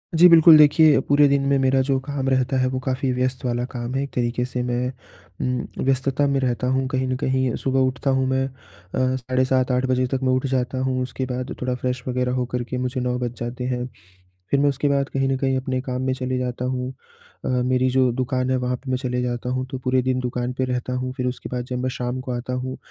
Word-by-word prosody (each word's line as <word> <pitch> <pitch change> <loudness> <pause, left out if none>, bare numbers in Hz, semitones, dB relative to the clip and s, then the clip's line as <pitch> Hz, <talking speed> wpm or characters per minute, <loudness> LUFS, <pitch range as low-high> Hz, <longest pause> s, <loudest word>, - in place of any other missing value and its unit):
जी, 175 +2 +8
बिल्कुल, 165 -1 +9
देखिए, 150 -1 +6
पूरे 145 0 +5
दिन 140 0 +2
में 140 0 +3
मेरा 135 0 +3
जो 135 -1 +2
काम 135 -1 -3
रहता 130 0 +1
है 130 0 +2
वो 130 - -2
काफ़ी 130 0 -1
व्यस्त 130 +1 -1
वाला 120 0 0
काम 120 +1 -4
है, 135 - 0
एक 140 - -5
तरीक़े 125 0 0
से 125 0 -3
मैं 125 0 -1 0.5
उम, 125 -1 -3
व्यस्तता 135 +1 +1
में 140 -1 +1
रहता 125 -1 0
हूँ 130 0 +1
कहीं 130 -1 0
न 130 - 0
कहीं 130 -3 0
सुबह 135 0 +1
उठता 130 +1 0
हूँ 130 - +1
मैं 130 0 +1
अ, 130 0 -4
साढ़े 130 +1 0
7-8 130 0 +1
बजे 130 0 +2
तक - - -1
मैं 130 - +2
उठ 130 +1 0
जाता 130 -1 -1
हूँ 130 -1 0
उसके 130 +1 -4
बाद 125 +1 -3
थोड़ा 125 0 -1
फ्रेश 125 0 -2
वगैरह 125 0 0
होकर 125 -1 -2
के 125 - -2
मुझे 125 0 -2
9 125 0 -1
बज 120 -1 -3
जाते 120 +1 -4
हैं, 125 -1 -2 0.7
फिर 140 - +3
मैं 145 0 +4
उसके 140 +2 -1
बाद 140 -1 +1
कहीं 135 0 +1
न 135 - +1
कहीं 135 0 0
अपने 130 0 -2
काम 130 -1 -3
में 130 0 0
चले 130 0 -2
जाता 125 0 -3
हूँ। 130 0 -2 0.5
अ, - - -1 0.2
मेरी 130 0 +2
जो 130 -1 +3
दुकान 130 +1 -1
है - - +3
वहाँ 125 0 -1
पे 130 - -10
मैं 130 - +1
चले 125 -1 -2
जाता 125 0 -3
हूँ 130 0 -1
तो 130 - -3
पूरे 130 0 +2
दिन 130 0 0
दुकान 125 0 -2
पे 130 - -2
रहता 125 0 -2
हूँ 130 0 -2
फिर 125 - -1
उसके 125 - -5
बाद 125 -1 -3
जब 125 0 -4
मैं 130 - 0
शाम 125 0 -3
को 130 - -5
आता 125 +1 -3
हूँ, 130 +1 -3
130 Hz, 245 wpm, -23 LUFS, 125-130 Hz, 0.7 s, बिल्कुल